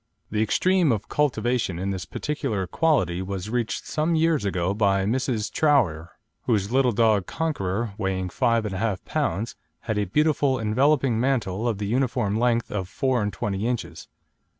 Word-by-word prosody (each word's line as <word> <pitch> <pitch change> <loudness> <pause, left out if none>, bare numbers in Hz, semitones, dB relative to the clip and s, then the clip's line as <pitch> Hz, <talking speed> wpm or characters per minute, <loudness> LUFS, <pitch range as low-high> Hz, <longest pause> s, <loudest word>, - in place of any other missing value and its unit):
The 105 0 0
extreme 180 - +3
of 105 -3 -2
cultivation 125 - 0
in 95 +2 -2
this 95 -1 -4
particular 135 -10 -3
quality 120 - +1
was 95 +2 -5
reached 120 -2 -2
some 160 +2 0
years 160 -7 +2
ago 90 -1 0
by 100 -2 +2
Mrs. 115 -1 -1
Troughear, 100 - +1 0.3
whose 105 -3 +1
little 130 -1 +3
dog 110 -4 +2
Conqueror, 115 - -2
weighing 95 -2 -1
5 115 +5 +1
1/2 105 0 -1
lb., 105 +7 -2 0.3
had 110 -2 -2
a 105 - 0
beautiful 145 - +2
enveloping 130 +2 +2
mantle 115 -5 0
of 115 -4 0
the 100 - -3
uniform 115 -3 0
length 120 -1 +1
of 95 -4 -3
four 130 +2 0
and 105 0 -1
twenty 100 +2 -2
inches. 85 -10 -4
110 Hz, 155 wpm, -25 LUFS, 100-130 Hz, 0.3 s, extreme